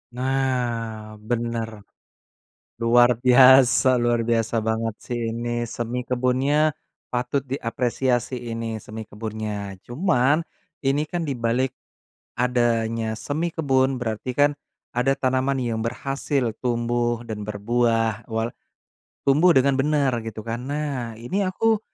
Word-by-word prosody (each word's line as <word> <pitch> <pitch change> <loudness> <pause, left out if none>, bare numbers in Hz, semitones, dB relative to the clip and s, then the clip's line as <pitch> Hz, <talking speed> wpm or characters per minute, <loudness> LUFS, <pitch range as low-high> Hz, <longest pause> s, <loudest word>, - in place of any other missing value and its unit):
Nah, 120 -5 -2
benar. 115 -1 -3 1.0
Luar 120 +1 +5
biasa 130 0 +6
luar 120 -1 +1
biasa 115 0 +1
banget 110 -1 -1
sih 120 -1 -3
ini 120 +1 -2
semi 120 +2 -3
kebunnya, 130 +5 +1 0.4
patut 125 +3 -1
diapresiasi 125 -1 -1
ini 115 -1 -4
semi 110 +1 -8
kebunnya. 105 -2 -5
Cuman, 145 +1 +2 0.4
ini 140 +2 +1
kan 175 +2 -3
di 140 -6 -3
balik 120 +3 +1 0.7
adanya 115 -2 +1
semi 155 +8 -3
kebun 130 -4 +1
berarti 115 +2 -3
kan 145 +1 +4 0.4
ada 125 +3 +1
tanaman 130 0 0
yang 115 -2 -1
berhasil 130 +2 -1
tumbuh 120 -1 0
dan 105 -3 -6
berbuah, 115 +1 0
wal 115 0 -2 0.7
tumbuh 155 +4 +5
dengan 135 +1 +4
benar 145 -2 +2
gitu 110 -1 -7
kan. 115 +1 -3
Nah, 140 -6 -3
ini 120 - -2
aku 210 +3 +1
120 Hz, 115 wpm, -24 LUFS, 115-135 Hz, 1.0 s, biasa